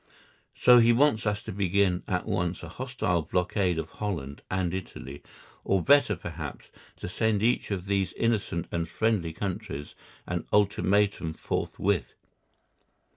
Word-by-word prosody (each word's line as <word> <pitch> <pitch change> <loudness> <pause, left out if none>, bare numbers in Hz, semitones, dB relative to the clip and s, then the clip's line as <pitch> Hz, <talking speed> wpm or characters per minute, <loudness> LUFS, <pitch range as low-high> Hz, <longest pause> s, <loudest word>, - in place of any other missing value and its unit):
So 125 0 +7
he 115 0 +6
wants 115 -4 +3
us 105 +1 -1
to - - -6
begin 95 -1 +1
at 90 -2 -1
once 90 0 -2
a - - -7
hostile 125 -10 -1
blockade 90 +2 0
of 80 0 -4
Holland 80 -10 -4
and 95 -2 -1
Italy, 70 -6 -7 0.4
or 95 -3 +1
better, 140 -7 +5
perhaps, 80 -4 -7 0.3
to - - -6
send 105 +3 0
each 120 +2 +2
of 95 -3 -3
these 95 -2 0
innocent 105 -7 0
and 85 -1 -2
friendly 105 -5 0
countries 80 -5 -5 0.3
an - - -3
ultimatum 100 -4 +2
forthwith. 95 -9 -1
95 Hz, 135 wpm, -28 LUFS, 85-105 Hz, 0.4 s, So